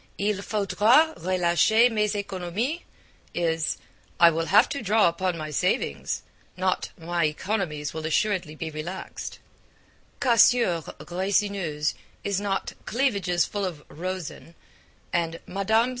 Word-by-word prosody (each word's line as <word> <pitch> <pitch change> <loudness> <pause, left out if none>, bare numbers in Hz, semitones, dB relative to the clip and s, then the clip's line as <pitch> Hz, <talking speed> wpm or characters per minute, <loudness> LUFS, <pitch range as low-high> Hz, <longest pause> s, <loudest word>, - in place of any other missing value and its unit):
'Il 205 0 0
faudra 220 +9 +3
relacher 185 +7 +3
mes 210 -1 +1
Economies' 200 - -2 0.6
is 165 -2 0 0.4
'I 170 -1 +8
will 165 0 -1
have 210 +6 +6
to 280 - -4
draw 215 -1 +4
upon 175 +1 -1
my 155 -1 -5
savings,' 70 - -1 0.3
not 185 0 0
'my 170 0 0
economies 155 -2 -2
will 160 - -5
assuredly 180 -2 0
be 160 +1 -5
relaxed'; 160 +5 -6 0.8
'cassures 235 - +4 0.2
resineuses' 185 -4 0 0.3
is 200 -1 -1
not 195 -1 -2
'cleavages 200 - +1
full 205 -1 -3
of 170 -6 -4
rosin,' 175 -1 -6 0.6
and 165 -1 0
'Mme. 220 +5 +2
185 Hz, 115 wpm, -26 LUFS, 165-210 Hz, 0.8 s, I